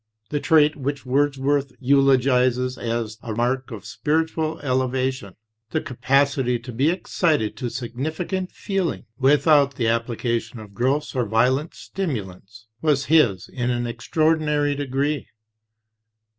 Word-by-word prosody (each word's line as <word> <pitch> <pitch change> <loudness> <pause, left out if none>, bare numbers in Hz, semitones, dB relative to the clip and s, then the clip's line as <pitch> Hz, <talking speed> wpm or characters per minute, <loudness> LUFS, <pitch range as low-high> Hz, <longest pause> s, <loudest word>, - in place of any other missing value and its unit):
The 145 - 0
trait 155 -1 +4
which 140 -1 -4
Wordsworth 140 0 +1
eulogizes 130 -2 +3
as 115 -1 -3
a 115 - -5
mark 125 +3 0
of 110 -3 -8
spiritual 160 +6 -1
elevation, 130 -5 -1 0.3
"the - - 0
capacity 130 0 +1
to 120 +2 -9
be 135 +7 +2
excited 160 - 0
to 125 -3 -3
significant 155 +10 -4
feeling 195 -4 -2
without 140 0 +4
the 120 -3 0
application 115 0 -2
of 105 -2 -12
gross 130 +8 0
or 125 -4 -1
violent 130 +8 +1
stimulants," 110 - -6 0.2
was 145 -4 +2
his 115 - +4
in 125 -1 -3
an 120 -1 -1
extraordinary 150 +4 +1
degree. 140 +1 -2
130 Hz, 120 wpm, -23 LUFS, 120-145 Hz, 0.3 s, trait